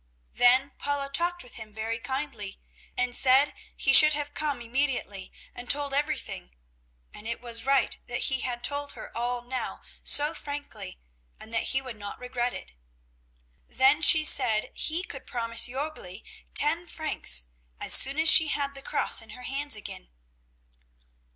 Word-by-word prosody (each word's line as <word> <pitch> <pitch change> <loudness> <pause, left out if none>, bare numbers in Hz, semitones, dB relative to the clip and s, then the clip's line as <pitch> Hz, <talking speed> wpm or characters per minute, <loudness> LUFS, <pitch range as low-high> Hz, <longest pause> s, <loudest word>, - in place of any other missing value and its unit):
Then 255 +3 +3
Paula 285 -1 -3
talked 350 +4 -1
with 245 - -14
him 215 -1 -12
very 225 +1 -4
kindly 245 -5 -5 0.4
and 250 0 0
said 265 +3 +4 0.2
he 270 - +2
should 305 +2 +9
have 290 0 -3
come 295 -4 -3
immediately 240 -5 -3 0.2
and 245 0 -10
told 285 -1 0
everything, 285 - -4 0.6
and 210 - -11
it 235 - -4
was 235 -1 -6
right 275 -1 +2
that 240 - -4
he 265 -1 +2
had 245 -1 -4
told 285 0 -2
her - - -11
all 240 +1 -3
now 255 +1 -5 0.2
so 295 +2 +3
frankly, 285 - -8 0.4
and 225 - -13
that 225 - -1
he 265 - -2
would 250 -4 -9
not 205 -1 -8
regret 245 0 -3
it. - - -10 0.9
Then 270 +4 +3
she 315 -1 +7
said 220 -7 +3
he 330 +4 -1
could 270 -8 -9
promise 230 -1 -1
Jörgli 255 -7 -7 0.3
ten 330 +4 +3
francs, 70 - +1 0.3
as - - +3
soon 275 +2 +4
as 320 +1 +4
she 320 -1 +9
had 285 -2 -3
the 275 - -10
cross - - 0
in 225 - -15
her 250 - -11
hands 275 +1 -1
again. - - -8
265 Hz, 160 wpm, -27 LUFS, 235-290 Hz, 0.9 s, should